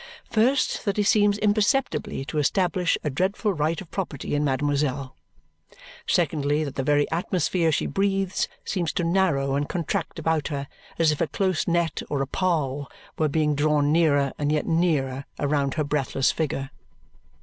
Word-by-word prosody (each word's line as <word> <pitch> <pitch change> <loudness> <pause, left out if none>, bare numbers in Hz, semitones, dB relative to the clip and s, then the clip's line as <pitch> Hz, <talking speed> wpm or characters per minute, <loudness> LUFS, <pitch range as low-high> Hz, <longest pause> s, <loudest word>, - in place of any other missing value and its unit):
First, 245 +5 +2
that 200 -1 0
he 210 - +3
seems 205 0 +3
imperceptibly 210 - +1
to 150 +3 -2
establish 180 +3 +1
a 150 - -1
dreadful 195 - 0
right 160 0 0
of 185 - -10
property 170 -8 -4
in 145 0 +1
mademoiselle. 140 -1 -1 0.9
Secondly, 145 0 +1
that 140 -3 -4
the 135 - -2
very 145 +1 +2
atmosphere 170 0 +1
she - - 0
breathes 195 -1 0 0.2
seems 175 -6 -1
to 175 - -1
narrow 165 -6 +1
and 145 +1 -1
contract 175 +1 -2
about 160 -2 0
her 140 -3 -4 0.3
as 165 -2 +4
if 150 - -3
a 165 - +2
close 185 -2 -1
net 170 -2 0
or 140 -2 0
a - - -5
pall 145 -5 -1 0.3
were 155 -1 +2
being 150 0 +1
drawn 145 0 +2
nearer 145 -4 +3
and 145 0 0
yet 150 -1 0
nearer 145 -6 0
around 140 -2 0
her 155 - +1
breathless 140 -2 +1
figure. 135 -3 -3
155 Hz, 160 wpm, -25 LUFS, 145-185 Hz, 0.9 s, as